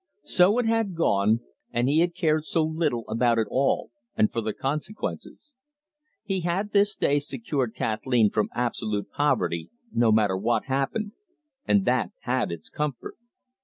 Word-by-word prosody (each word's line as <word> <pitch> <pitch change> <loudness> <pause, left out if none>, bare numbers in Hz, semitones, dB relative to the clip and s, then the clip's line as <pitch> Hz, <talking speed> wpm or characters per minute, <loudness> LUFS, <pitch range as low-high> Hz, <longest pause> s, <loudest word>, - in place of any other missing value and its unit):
So 185 +5 +4
it 245 - +1
had 225 -4 +1
gone, 110 -7 +2 0.3
and 120 +1 +1
he 150 +3 +3
had 170 0 +1
cared 155 -3 +1
so 165 - +1
little 155 -7 -1
about 115 +1 +2
it 110 - +2
all, 135 -2 +1 0.2
and 110 - +3
for 115 - -1
the 110 0 -2
consequences. 180 - -5 0.7
He 195 -3 -1
had 180 +4 -1
this 205 0 +3
day 145 +1 +2
secured 135 -3 -3
Kathleen 110 0 +1
from 105 - 0
absolute 110 -4 -2
poverty, 90 - 0 0.2
no 115 -1 +3
matter 105 -3 +3
what 110 +5 0
happened, 140 +11 -1 0.6
and 200 -1 +3
that 125 -5 +1
had 125 -5 -1
its 85 -2 -7
comfort. 150 -5 -4
135 Hz, 155 wpm, -26 LUFS, 115-170 Hz, 0.7 s, So